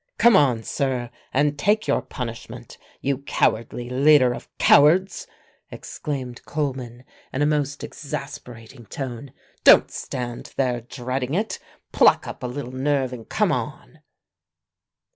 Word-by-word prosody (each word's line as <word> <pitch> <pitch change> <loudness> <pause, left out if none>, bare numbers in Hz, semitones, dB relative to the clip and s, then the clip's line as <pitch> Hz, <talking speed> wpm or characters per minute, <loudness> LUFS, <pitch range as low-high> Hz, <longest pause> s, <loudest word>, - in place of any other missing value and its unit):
"Come 235 -2 +6
on, 125 -9 +3
sir, 125 -2 -2 0.2
and 145 +2 +1
take 210 +6 +2
your - - +2
punishment, 115 -3 -8 0.2
you 135 -1 -1
cowardly 120 -3 -1
leader 130 0 +4
of - - -9
cowards!" 175 +6 +4 0.4
exclaimed 130 -5 -6
Coleman 130 -5 -4 0.3
in 135 - 0
a - - +3
most 145 -1 -1
exasperating 125 -5 -8
tone. 130 -1 -6 0.3
"Don't - - +7
stand 120 -1 -6
there 125 -3 0
dreading 125 +3 -4
it. 210 +4 -2 0.3
Pluck - - +4
up - - -8
a 125 - -3
little 125 0 -6
nerve 130 -1 0
and 115 -3 -10
come - - +1
on!" - - -5
130 Hz, 125 wpm, -23 LUFS, 125-145 Hz, 0.4 s, Don't